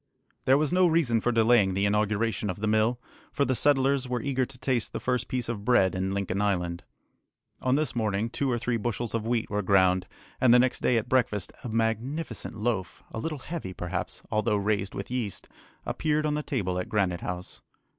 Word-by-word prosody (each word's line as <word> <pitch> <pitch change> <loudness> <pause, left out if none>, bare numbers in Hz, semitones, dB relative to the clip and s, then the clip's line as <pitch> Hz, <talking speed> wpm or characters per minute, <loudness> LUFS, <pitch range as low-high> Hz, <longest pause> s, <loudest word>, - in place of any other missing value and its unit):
There 135 +1 +5
was 155 +2 0
no 185 0 +5
reason 150 -9 +2
for 120 - +1
delaying 115 -4 +4
the 100 +1 +1
inauguration 105 +1 0
of 90 - -4
the 110 - -1
mill, 110 +3 +2 0.3
for 140 0 +1
the 130 - +1
settlers 135 -1 +2
were 125 -1 0
eager 130 -2 0
to 135 - -11
taste 125 -3 -1
the - - -2
first 125 -1 -1
piece 125 -1 -2
of 110 -3 -4
bread 105 -5 +4
in 95 0 -1
Lincoln 100 0 -1
Island. 90 -4 0 0.8
On 130 0 +2
this 150 -2 -1
morning 110 -1 0
two 130 +3 -2
or 120 - +1
three 120 0 -1
bushels 120 +1 -3
of 115 -1 -2
wheat 115 -3 0
were 105 0 0
ground, 95 -1 +3 0.3
and 130 -3 +6
the 120 - +8
next 125 +1 +2
day 125 - +2
at 110 - -1
breakfast 110 -7 0
a 125 - -4
magnificent 115 +6 -2
loaf, 110 -4 -2
a - - -5
little 155 +5 -3
heavy 140 - -6
perhaps, 90 0 -4
although 110 0 +1
raised 100 -1 -1
with 100 - -6
yeast, 120 -7 -3 0.4
appeared 155 -1 0
on 150 - +1
the 150 - -1
table 95 -11 -2
at 90 - -4
Granite 95 -5 0
House. 90 +1 -6
115 Hz, 205 wpm, -27 LUFS, 100-130 Hz, 0.8 s, the